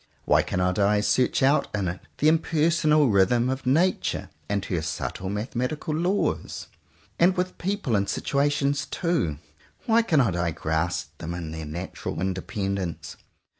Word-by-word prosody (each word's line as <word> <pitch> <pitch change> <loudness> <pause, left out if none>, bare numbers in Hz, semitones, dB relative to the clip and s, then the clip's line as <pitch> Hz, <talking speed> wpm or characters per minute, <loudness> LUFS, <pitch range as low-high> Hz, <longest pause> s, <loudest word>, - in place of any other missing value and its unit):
Why - - +4
cannot 90 +1 -1
I 105 +1 +3
search 125 +5 +2
out 140 +3 +4
in 100 -3 -1
it 90 +1 -3 0.2
the 150 - +2
impersonal 155 -2 +3
rhythm 115 +5 +3
of 130 -1 -4
Nature 165 +8 +1 0.2
and 100 -1 -1
her 85 -4 -1
subtle 85 +4 -4
mathematical 125 +9 -3
laws? 180 +5 -1 0.5
And 180 +2 +4
with 180 0 -2
people 190 - -1
and 100 -1 +1
situations 145 +3 0
too; 165 - -1 0.5
why 230 0 +4
cannot 140 - +2
I 85 -1 0
grasp 80 +1 -2
them 85 +1 -4
in 85 -3 -5
their 80 -1 -6
natural 85 +3 -5
independence? 95 -1 -3
110 Hz, 140 wpm, -25 LUFS, -, 0.5 s, Why